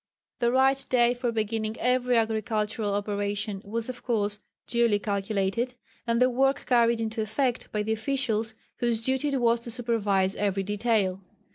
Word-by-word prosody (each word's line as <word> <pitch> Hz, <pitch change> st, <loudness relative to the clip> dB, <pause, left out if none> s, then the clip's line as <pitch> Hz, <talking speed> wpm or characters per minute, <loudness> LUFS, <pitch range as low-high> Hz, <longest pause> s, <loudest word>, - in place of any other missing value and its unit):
The 235 Hz, 0 st, +2 dB
right 265 Hz, +1 st, +3 dB
day 240 Hz, -1 st, +4 dB
for 245 Hz, -1 st, -2 dB
beginning 220 Hz, 0 st, -2 dB
every 250 Hz, 0 st, +2 dB
agricultural 220 Hz, -1 st, 0 dB
operation 205 Hz, 0 st, -2 dB
was 225 Hz, +3 st, -3 dB
of 250 Hz, -1 st, -6 dB
course 210 Hz, -3 st, -1 dB, 0.3 s
duly 235 Hz, -3 st, +2 dB
calculated, 205 Hz, +4 st, -1 dB, 0.3 s
and 230 Hz, 0 st, +2 dB
the 250 Hz, -, +5 dB
work 270 Hz, +2 st, +1 dB
carried 235 Hz, -2 st, +3 dB
into 225 Hz, 0 st, -2 dB
effect 240 Hz, +4 st, -1 dB
by 210 Hz, -1 st, -1 dB
the 220 Hz, +1 st, 0 dB
officials 225 Hz, -2 st, -1 dB, 0.2 s
whose 230 Hz, -2 st, 0 dB
duty 265 Hz, +2 st, +1 dB
it 275 Hz, -2 st, 0 dB
was 235 Hz, -1 st, +3 dB
to 235 Hz, -, -8 dB
supervise 210 Hz, -5 st, 0 dB
every 195 Hz, -1 st, 0 dB
detail. 205 Hz, -2 st, 0 dB
225 Hz, 155 wpm, -27 LUFS, 210-245 Hz, 0.3 s, the